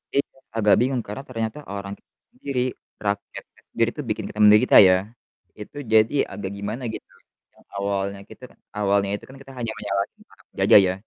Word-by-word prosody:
Iya, 140 - +1 0.3
agak 105 -2 +5
bingung 130 -1 +1
karena 105 +7 -6
ternyata 115 +2 -3 0.2
orang 100 0 -5
kita - - -36 0.2
sendiri, 135 -3 -3 0.4
rakyatnya 100 0 -5
sendiri 115 0 +1
itu 150 - -5
bikin 105 - -2
kita 105 - -9
menderita 105 +1 +6
ya, 95 - +6 0.7
itu 125 - -10 0.2
jadi 110 +4 +5 0.2
agak 95 -1 -5
gimana 105 +6 -5
gitu. - - -9 0.4
Yang - - -25
awalnya 100 0 -2
kita - - -14
kan - - -26 0.2
awalnya 100 -1 +2
itu - - -9
kan 135 - -12
kita 135 - -12
hanya 115 -2 -3
menyalahin 100 -1 -3
para - - -21
penjajah - - +6
ya. 90 - 0
105 Hz, 180 wpm, -23 LUFS, 100-120 Hz, 0.7 s, menderita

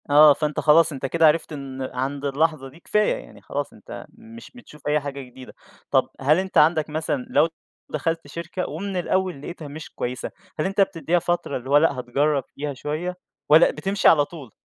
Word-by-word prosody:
آه. 150 +1 +8
فأنت 150 +1 -2
خلاص، 160 +2 +5
أنت 135 -2 -5
كده 165 +4 +4
عرفت 155 +1 +1
إن 135 -2 -7
عند 135 +3 -3
اللحظة 140 -1 0
دي، 150 +6 -17
كفاية، 210 - +1
يعني - - -12
خلاص - - -4
أنت - - -10
مش 230 0 -13
بتشوف 150 -13 -12
أي 150 +1 +3
حاجة 140 -1 -6
جديدة. 130 0 -12 0.4
طب - - +3
هل 145 +4 +4
أنت 190 0 -2
عندك 155 0 +4
مثلًا 150 -4 -2
لو 150 +3 +4 0.4
دخلت 165 -2 -2
شركة 170 +5 -5
ومن 195 +6 -5
الأول 180 -3 -1
لقيتها 160 0 -8
مش 155 +2 -9
كويسة، 125 +1 -4 0.3
هل - - +1
أنت 195 +1 +1
بتدّيها 175 -3 +1
فترة 175 -3 -1
اللي 130 +1 -9
هو 145 - +6
لأ، 145 -3 +2
هتجرّب 140 +3 0
فيها 145 0 -4
شوية 155 +7 -4 0.3
والّا 155 +2 +7
بتمشي 195 +1 0
على 145 -3 +6
طول؟ 145 -8 -11
150 Hz, 190 wpm, -23 LUFS, 140-170 Hz, 0.4 s, آه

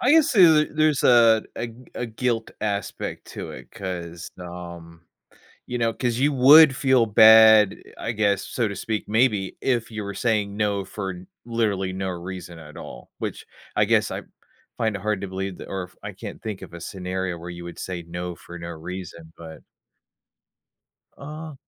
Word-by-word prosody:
I 255 - +3
guess 320 0 +5
there's 190 -7 +8 0.2
a - - -17
there's 155 -2 +2
a 115 -3 +6
a 115 - -3 0.3
a 125 - -3
guilt 115 0 -2
aspect 100 -2 -3
to - - -7
it, - - -11
'cause, 85 -2 -6
um, 85 -1 -9 0.6
you 125 - -3
know, 115 -1 +1
'cause 120 -1 -1
you 145 +2 +2
would 140 +2 +8
feel 130 -2 +3
bad, 110 -1 +7 0.2
I - - -3
guess, 105 -3 +1
so 120 -3 -1
to 100 - -5
speak, 110 +2 -3
maybe, 105 -3 +1
if 120 -3 0
you 110 -2 -5
were 100 0 -5
saying 105 -2 0
no 100 -2 0
for 95 -2 -6 0.2
literally 105 -5 -1
no 95 0 -3
reason 90 -1 -7
at 75 -1 -12
all, - - -10
which - - -5 0.3
I - - +3
guess, - - +2
I - - -4 0.6
find 110 -2 0
it 100 - -5
hard 105 -1 -1
to 100 - -4
believe 95 0 -5
that - - -10
or 95 -1 -3
if 90 - -13
I - - -5
can't - - -9
think 105 -3 -5
of - - -11
a 85 - -9
scenario 90 0 -4
where 85 +1 -9
you 85 -1 -8
would 85 0 -9
say 90 -2 -5
no 90 +1 -6
for 85 0 -11
no 85 0 -7
reason, 85 0 -8
but 80 -1 -11 1.6
Uh 155 +2 -8
100 Hz, 185 wpm, -24 LUFS, 90-115 Hz, 1.6 s, there's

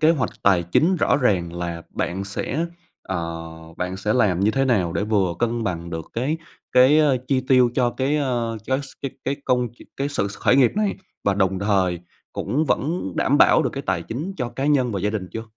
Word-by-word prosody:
kế 155 - +5
hoạch 135 -8 0
tài 95 -3 +4
chính 160 - +2
rõ - - +2
ràng 95 -11 +1
là 85 -1 -4
bạn 95 +3 -3
sẽ, 130 +11 -2 0.4
ờ, 85 -3 -4 0.3
bạn 90 +1 -3
sẽ 105 +2 -1
làm 100 -8 +2
như 100 +2 +3
thế 135 +3 +1
nào 100 -10 +1
để - - -1
vừa 100 -5 +1
cân 120 -1 0
bằng 85 -3 -3
được 80 -2 -5
cái 130 +7 -1 0.4
cái, 130 +4 +6
ơ, 145 -4 +4
chi 135 -2 +2
tiêu 125 -2 +5
cho 125 -2 +2
cái, 135 +4 0
ơ, 120 -5 -1
cái 130 +1 +1
s - - -9 0.2
cái 140 - -2
cái 135 +1 -1
công 125 -1 +1
ch - - -29 0.2
cái 140 +1 -1
sự 140 -8 -1
s 100 - -9
khởi 125 - +3
nghiệp 130 -4 +5
này 210 -2 +1 0.3
và 100 - +2
đồng 95 -1 +1
thời 95 -3 +1 0.3
cũng 150 +5 -1
vẫn 150 - -1
đảm - - +2
bảo - - +6
được - - 0
cái - - -5
tài - - 0
chính 150 +12 -5
cho 125 -4 -2
cá 135 +3 -3
nhân 130 -5 +2
và 100 - -2
gia 105 +2 0
đình 100 -4 -4
chưa? 115 - -4
115 Hz, 225 wpm, -23 LUFS, 95-135 Hz, 0.4 s, cái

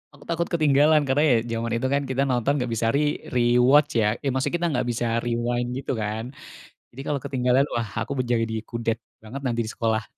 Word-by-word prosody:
aku 145 - -17
takut 170 +1 0
ketinggalan. 155 -1 +4
Karena 135 +3 +2
ya - - +5 0.2
zaman 115 0 -2
itu 130 +3 0
kan 140 0 +2
kita 130 +1 0
nonton 130 +1 +1
nggak 125 -2 -2
bisa 115 0 0
re 150 0 +1 0.2
rewatch 125 +5 +4
ya. 105 +1 +2
Eh, 135 - 0
maksudnya 130 +6 -1
kita 175 - +1
nggak 125 -2 -1
bisa 120 +1 -2
rewind 120 +1 -1
gitu, 135 - -4
kan. 110 +4 -4 0.6
Jadi 135 +3 -9
kalau 145 -2 0
ketinggalan, 125 0 +2
wah 115 -2 -1 0.2
aku 140 -2 -4
menjadi 115 -2 0
kudet 115 -1 -2 0.2
banget 130 +6 -7
nanti 120 -1 0
di 110 - -5
sekolah. 110 -1 -1
125 Hz, 200 wpm, -24 LUFS, 115-140 Hz, 0.6 s, ya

